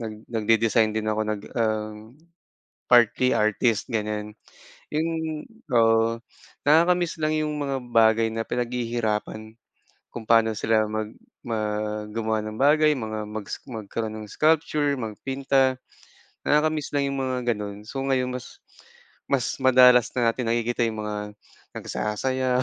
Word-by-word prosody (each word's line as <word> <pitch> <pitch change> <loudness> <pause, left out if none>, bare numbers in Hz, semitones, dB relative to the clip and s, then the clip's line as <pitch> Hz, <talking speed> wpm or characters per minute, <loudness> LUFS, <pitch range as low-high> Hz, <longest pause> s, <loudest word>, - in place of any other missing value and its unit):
nag 110 -2 -5
nagde-design 115 0 +2
din 110 0 -1
ako, 110 0 0
nag, 105 -1 -3
ah, 110 -2 0 1.0
partly 120 +1 +5
artist, 110 +1 +1
ganiyan, 105 -1 -2 0.6
yung, 160 0 -2 0.3
oo, 115 0 +3 0.5
nakaka-miss 170 +2 +3
lang 155 0 +1
yung 155 0 -1
mga 140 -1 -1 0.2
bagay 115 0 +4
na 115 - -2
pinaghihirapan 115 -3 -2 0.6
kung 115 - -7
paano 115 -1 +4
sila 110 0 +2
mag 110 0 -4 0.3
mag 105 -1 -3
gumawa 110 -1 -1
ng 110 0 -6
bagay, 150 +2 +5
mga 110 -3 -4
mag 105 -1 -6 0.2
magkaroon 110 -1 -5
ng - - -13
sculpture, 155 -2 +2
magpinta, 135 +3 0 0.7
nakaka-miss 150 0 +1
lang 140 -1 +1
yung 140 - -3
mga 130 -1 -1 0.2
gano'n. 105 0 -7
So, 135 - -7
ngayon 130 -2 0
mas 125 - -12 0.7
mas 135 -3 0
madalas 125 -2 +6
na 120 -2 +3
natin 125 0 -4
nakikita 120 +1 0
yung 110 -1 -4
mga 105 0 -5 0.4
nagsasayaw, 130 +4 -1
115 Hz, 125 wpm, -25 LUFS, 110-135 Hz, 1.0 s, madalas